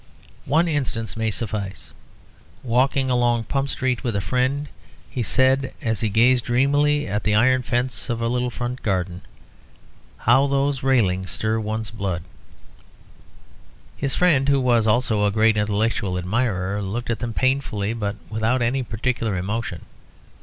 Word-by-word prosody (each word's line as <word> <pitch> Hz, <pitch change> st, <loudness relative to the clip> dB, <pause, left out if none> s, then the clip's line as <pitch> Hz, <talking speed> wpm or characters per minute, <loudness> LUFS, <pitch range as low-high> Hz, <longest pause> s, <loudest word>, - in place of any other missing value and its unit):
One 160 Hz, +5 st, +3 dB
instance 130 Hz, -7 st, -2 dB
may 110 Hz, 0 st, 0 dB
suffice. 105 Hz, -3 st, -4 dB, 0.7 s
Walking 130 Hz, +2 st, +1 dB
along 120 Hz, -2 st, +2 dB
Pump 135 Hz, +4 st, -2 dB
Street 130 Hz, -4 st, -1 dB
with 120 Hz, -5 st, -1 dB
a -, -, +1 dB
friend, 130 Hz, +9 st, 0 dB, 0.4 s
he 125 Hz, -, -3 dB
said, 130 Hz, +3 st, +2 dB
as 110 Hz, -3 st, -1 dB
he 110 Hz, -, 0 dB
gazed 120 Hz, +4 st, +3 dB
dreamily 145 Hz, +4 st, +2 dB
at 105 Hz, +2 st, -2 dB
the 105 Hz, -1 st, +2 dB
iron 130 Hz, +4 st, +4 dB
fence 120 Hz, -2 st, -2 dB
of 120 Hz, -1 st, -1 dB
a 115 Hz, -, 0 dB
little 125 Hz, +1 st, 0 dB
front 125 Hz, +1 st, -5 dB
garden, 90 Hz, -3 st, -2 dB, 1.0 s
"How 135 Hz, +4 st, +4 dB
those 140 Hz, -1 st, 0 dB
railings 95 Hz, -9 st, +1 dB
stir 110 Hz, +1 st, -1 dB
one's 110 Hz, 0 st, -3 dB
blood!" 95 Hz, -6 st, -3 dB, 1.7 s
His 140 Hz, -1 st, -2 dB
friend, 145 Hz, -7 st, +3 dB
who 140 Hz, -1 st, +4 dB
was 120 Hz, -3 st, +2 dB
also 110 Hz, -2 st, +2 dB
a 105 Hz, -, +2 dB
great 110 Hz, +1 st, +3 dB
intellectual 105 Hz, -2 st, 0 dB
admirer, 100 Hz, 0 st, -1 dB
looked 115 Hz, +5 st, -3 dB
at 115 Hz, -, -2 dB
them 120 Hz, -, -3 dB
painfully, 130 Hz, -6 st, 0 dB
but 105 Hz, -3 st, -3 dB
without 110 Hz, +3 st, 0 dB
any 130 Hz, +3 st, +1 dB
particular 115 Hz, -3 st, -2 dB
emotion. 95 Hz, -2 st, -3 dB
115 Hz, 145 wpm, -22 LUFS, 105-130 Hz, 1.7 s, iron